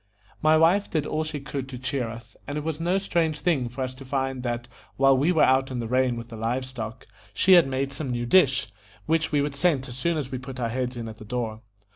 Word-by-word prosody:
My 155 +1 +5
wife 175 +6 +4
did 155 -3 0
all 155 +1 -1
she 155 -1 -4
could 140 -1 -5
to 130 - -6
cheer 125 -1 -2
us, 115 +1 -10
and 145 +1 -3
it 150 - -3
was 160 -1 -3
no 175 +3 +1
strange 165 -5 0
thing 140 -9 +1
for 125 +3 -4
us 130 0 -3
to 135 +1 -11
find 135 -1 -2
that 120 -1 -3 0.3
while 135 0 +5
we 145 +7 +3
were 160 - +4
out 130 +1 +4
in 130 - -4
the 115 -1 -3
rain 125 0 +2
with 115 0 -7
the 115 - -8
live 120 +4 -1
stock, 115 -4 -7 0.3
she 190 - +3
had 175 -5 +7
made 135 +1 -2
some 140 -1 -4
new 120 -1 -2
dish, 130 - +4 0.3
which 165 +1 +1
we 145 -2 +3
would 145 0 -2
scent 140 -4 +1
as 120 - -8
soon 165 +5 0
as 135 -3 -4
we 130 - -3
put 130 0 -8
our 115 -2 -1
heads 125 +1 -2
in 115 -1 -5
at 110 -1 -9
the - - -9
door. 110 -1 -3
130 Hz, 260 wpm, -26 LUFS, 125-155 Hz, 0.3 s, had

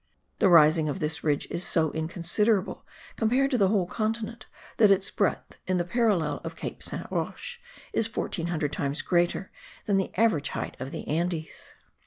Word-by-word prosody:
The 195 - +5
rising 155 -2 +6
of 145 - -3
this 155 +1 -2
ridge 145 -2 +1
is 170 - -2
so 160 -5 +2
inconsiderable 180 +6 0 0.3
compared 255 +5 +2
to 255 - +2
the 195 - +5
whole 195 -2 +2
continent 225 +3 -3 0.3
that 215 -2 +6
its 195 0 +2
breadth 200 - -1
in 185 0 +1
the 175 - +1
parallel 180 -9 +1
of 165 0 -6
Cape - - -6
Saint - - -4
Roche 485 -1 -4 0.3
is 225 - +2
1400 165 -7 -2
times 140 0 -2
greater 175 +2 +1 0.3
than 200 -2 +2
the 190 - -1
average 205 -10 +2
height - - -4
of 130 - -5
the - - -7
Andes. 165 +1 -3
175 Hz, 170 wpm, -27 LUFS, 160-215 Hz, 0.3 s, rising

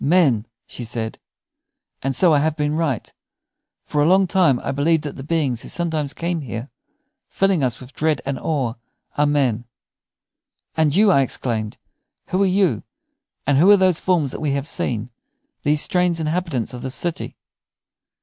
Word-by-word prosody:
"Men!" 140 - +3 0.2
she 125 - -6
said. 115 -1 -4 0.8
"And 135 0 -1
so 175 +1 +4
I 145 - +4
have 155 +1 0
been 150 0 0
right. 155 -8 -2 0.7
For 150 - 0
a 150 - +4
long 190 +2 +5
time 175 -9 +3
I - - -12
have 135 - -2
believed 160 +2 +2
that 145 - -5
the - - -8
beings 140 -5 0
who - - -7
sometimes 160 -5 -2
come 170 -1 -2
here, 120 0 -6 0.6
filling 195 -6 +1
us 125 -1 -1
with 130 +1 -12
dread 155 -2 +1
and 135 -1 -2
awe, 135 -7 -1 0.4
are 145 0 +3
men." 130 -6 +1 1.1
"And 155 -2 +2
you," 205 +1 +5
I 140 - +5
exclaimed 115 -4 -2 0.5
"who 185 - +1
are 195 - +4
you, 185 - +2 0.6
and 140 -1 +3
who 180 +6 +6
are 205 - +8
these 185 -3 +3
forms 165 -8 +1
that - - -6
we 150 -3 0
have 140 +1 -2
seen, 120 -6 -3 0.5
these 150 0 +2
strange 180 -2 +1
inhabitants 160 - -2
of 125 - -7
this 130 +1 -3
city?" 170 -2 -2
150 Hz, 175 wpm, -21 LUFS, 130-170 Hz, 1.1 s, are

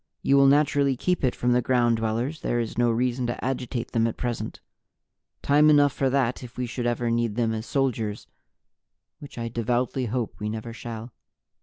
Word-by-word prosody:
You 140 - +3
will 140 0 +6
naturally 140 -1 +3
keep 180 +4 0
it 130 - +1
from 125 - 0
the 125 0 +3
Ground 120 -2 +2
Dwellers; 115 +7 -2
there 120 - 0
is 115 -2 -3
no 120 0 +2
reason 125 +1 0
to 120 - -4
agitate 125 -2 -3
them 115 0 +2
at 115 - -4
present. 120 -3 -4 0.8
Time 150 +2 +5
enough 145 -1 +5
for 135 - 0
that 130 -2 0
if 125 0 -11
we 125 - -1
should 120 0 -3
ever 120 0 0
need 115 -2 0
them 115 -1 +1
as 110 +1 -5
soldiers 115 -6 -1 0.9
which 145 -4 -11
I 115 -1 -3
devoutly 120 +2 -1
hope 120 0 -3
we 105 - -3
never 110 +1 -5
shall." 115 0 -8
120 Hz, 190 wpm, -25 LUFS, 115-135 Hz, 0.9 s, will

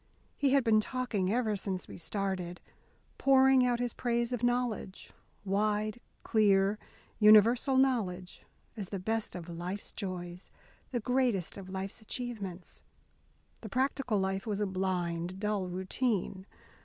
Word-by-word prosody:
He 280 - +2
had 275 -2 +4
been 220 -2 +4
talking 215 -5 -1
ever 225 -2 +1
since 190 -2 -4
we - - -9
started, 185 -2 -3 0.6
pouring 265 -1 +5
out 245 -1 +1
his 245 -1 -1
praise 235 0 -1
of 245 - -2
knowledge, 245 -5 -1 0.3
wide, 210 +3 0 0.2
clear, 205 -1 +3 0.4
universal 230 +5 +6
knowledge, 200 -9 0 0.3
as 200 -4 -6
the 200 - -3
best 220 +4 -2
of 175 -2 -7
life's 175 +4 -5
joys, 180 -2 -6 0.4
the 245 - -1
greatest 245 -6 0
of 190 -2 -9
life's 190 +3 -5
achievements. 210 -6 -6 0.8
The 220 - -7
practical 260 -1 0
life 190 +1 -1
was 210 -2 -1
a 210 - +1
blind, 185 -2 -2
dull 210 -2 -1
routine. 190 +1 -2
210 Hz, 130 wpm, -31 LUFS, 190-240 Hz, 0.8 s, universal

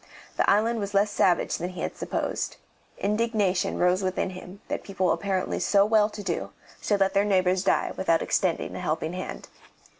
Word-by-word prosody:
The - - +2
island 225 +3 +3
was 200 -1 -4
less 205 +1 +3
savage 180 -3 +2
than 175 +2 -3
he 185 - -7
had - - -3
supposed. - - -3 0.4
Indignation 210 -3 0
rose 180 +2 +2
within 185 0 -1
him 185 +1 -10
that - - -3
people 190 -2 0
apparently 190 -2 -1
so 200 +2 +4
well 215 -1 +3
to 210 -1 -8
do 175 -4 -3 0.3
should 205 -2 0
let 195 0 +3
their 200 0 +3
neighbours 185 -2 +2
die 195 - +1
without 165 -3 +1
extending 180 -4 0
a - - -5
helping 160 +2 -2
hand. 185 0 -6
195 Hz, 180 wpm, -26 LUFS, 185-205 Hz, 0.4 s, so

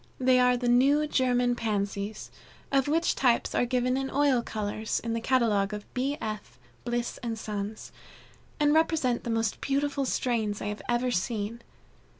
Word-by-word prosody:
They 255 0 +4
are 250 0 +4
the 245 0 -2
"New 275 +5 +4
German 245 -3 +2
Pansies," 205 -2 -3 0.4
of 275 -1 +2
which 330 +3 +2
types 245 -3 +2
are 245 - +1
given 250 0 +1
in 270 0 -2
oil 280 -4 +2
colors, 215 -1 -3
in 230 0 -3
the 230 - -2
catalogue 220 -5 +2
of 210 - -8
B. 275 +3 -1
F. 210 - -6 0.3
Bliss 240 0 -2
& - - -2
Sons, 210 -1 -5 0.7
and 295 0 +4
represent 315 -6 +2
the - - -4
most 225 -2 -1
beautiful 280 0 0
strains 225 -5 -1
I 205 - -3
have 210 - -5
ever 240 +1 +1
seen. 220 +2 -2
240 Hz, 160 wpm, -28 LUFS, 215-260 Hz, 0.7 s, They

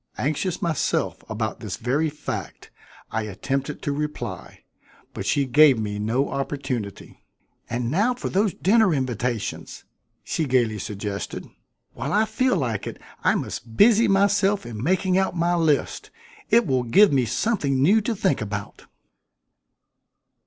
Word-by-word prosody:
Anxious 160 +6 -2
myself 165 -4 -1
about 110 0 -3
this 105 -2 -5
very 135 +7 0
fact, 150 - -7 0.4
I 110 - -1
attempted 135 +8 -3
to 145 - -1
reply, 150 +1 -5 0.5
but - - -5
she 140 - +2
gave 140 0 +6
me 105 -1 -3
no 115 +6 0
opportunity. 135 -7 -5 0.5
"And 120 0 -2
now 215 - +2
for 250 - -5
those 200 +1 +1
dinner 205 -3 +3
invitations!" 125 -4 -3 0.4
she 160 - -1
gaily 120 -5 +1
suggested. 100 0 -5 0.5
"While 145 +3 -4
I 215 +1 +4
feel 255 +4 +1
like 115 - -2
it - - -7 0.2
I - - +3
must 110 -1 -5
busy 225 +1 +6
myself 200 - +2
in 115 -3 -6
making 185 - +2
out 190 -2 -1
my 170 +1 +2
list. 160 -5 0 0.4
It 230 +1 +5
will 130 -4 +1
give 165 - +5
me 130 -3 +3
something 140 - 0
new 195 +11 +4
to 225 +2 -2
think 190 - 0
about." 100 -1 -6
140 Hz, 140 wpm, -24 LUFS, 120-190 Hz, 0.5 s, gave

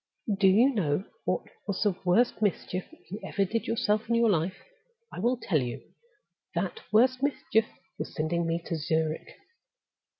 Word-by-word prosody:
"Do 195 - +6
you 230 +9 +5
know 175 -6 +1 0.2
what - - 0 0.2
was 200 0 0
the 205 -4 +2
worst 200 +7 +3
mischief 185 -2 -1 0.3
you 205 - -4
ever 200 - 0
did 225 +4 -2
yourself 220 -2 0
in 235 - +3
your 230 -2 +4
life? 175 +1 0 0.6
I - - -6
will 240 +6 +2
tell 155 - +1
you. 120 -1 -6 0.6
That 455 - -1
worst 255 +4 +4
mischief 270 -5 +1 0.3
was - - -5
sending 170 +2 0
me 165 0 -1
to 165 - -2
Zurich." 160 0 -1
195 Hz, 160 wpm, -28 LUFS, 170-230 Hz, 0.6 s, Do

